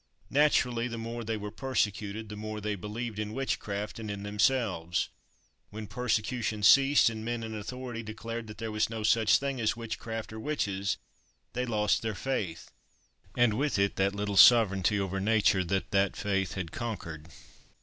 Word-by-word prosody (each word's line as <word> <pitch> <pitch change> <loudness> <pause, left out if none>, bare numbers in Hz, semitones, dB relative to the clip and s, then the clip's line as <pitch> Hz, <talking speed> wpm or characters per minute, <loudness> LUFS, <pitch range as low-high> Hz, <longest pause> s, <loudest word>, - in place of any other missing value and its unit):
Naturally, 125 -5 +3
the 115 -1 -5
more 115 +1 -5
they 110 0 -2
were 105 0 -6
persecuted 105 -4 -2
the 105 - -7
more 110 0 -5
they 105 0 -2
believed 105 +3 -5
in 105 +1 -3
witchcraft 105 -6 -3
and 110 -2 -5
in 100 -1 -5
themselves; 105 -5 +1 0.6
when 110 +1 -7
persecution 110 -1 -1
ceased, 135 +6 +6
and 110 -1 -2
men 120 0 -3
in 110 0 -5
authority 120 +2 -5
declared 115 +1 -6
that 105 -1 -9
there 110 0 -4
was 110 0 +1
no 110 -1 -4
such 110 0 +4
thing 135 -3 -3
as 115 +2 +1
witchcraft 115 -1 -5
or 110 - -6
witches, 100 - -1 0.6
they 125 +1 -2
lost 105 -3 +1
their 110 -2 -2
faith, 95 - -3 0.7
and 120 -3 +4
with 140 +3 0
it 100 0 +1
that 100 +1 +1
little 100 -1 -2
sovereignty 105 -3 +6
over 95 0 -2
nature 100 -2 +3
that 95 +2 -2
that 100 -1 +2
faith 95 -4 -1
had 90 -5 -4
conquered. 85 -9 -5
110 Hz, 170 wpm, -29 LUFS, 100-115 Hz, 0.7 s, ceased